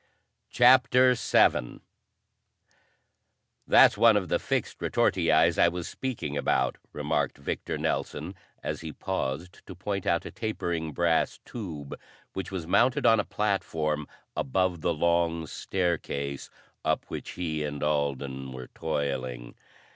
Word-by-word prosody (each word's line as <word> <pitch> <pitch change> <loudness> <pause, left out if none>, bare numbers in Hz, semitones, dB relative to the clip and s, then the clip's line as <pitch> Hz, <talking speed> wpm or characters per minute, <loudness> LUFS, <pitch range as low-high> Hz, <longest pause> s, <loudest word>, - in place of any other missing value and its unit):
CHAPTER 125 0 +6
VII 110 - +2 1.9
"That's - - +6
one 115 -2 +7
of 95 -3 -2
the - - +2
fixed - - -2
retortiis - - +2
I - - +6
was 85 0 -3
speaking 120 - -4
about," 65 -2 0
remarked - - -1
Victor 70 - -4
Nelson 80 +6 -2 0.3
as 75 +1 -3
he 80 -1 -6
paused 90 -2 -4
to 95 - -8
point 100 +2 -3
out 85 0 +1
a - - -6
tapering 85 -7 -3
brass 85 +1 +1
tube 80 - -7 0.4
which 95 -2 -4
was 90 -4 -4
mounted 125 - +3
on 115 -1 +6
a - - +2
platform 80 -9 -1 0.3
above 90 +4 0
the 85 - +1
long 85 0 +1
staircase 75 -5 -2 0.3
up - - 0
which - - -6
he 80 -4 -2
and 75 -1 -4
Alden 70 -3 -1
were 65 -1 -8
toiling. 65 -6 -3
85 Hz, 125 wpm, -28 LUFS, 70-95 Hz, 1.9 s, one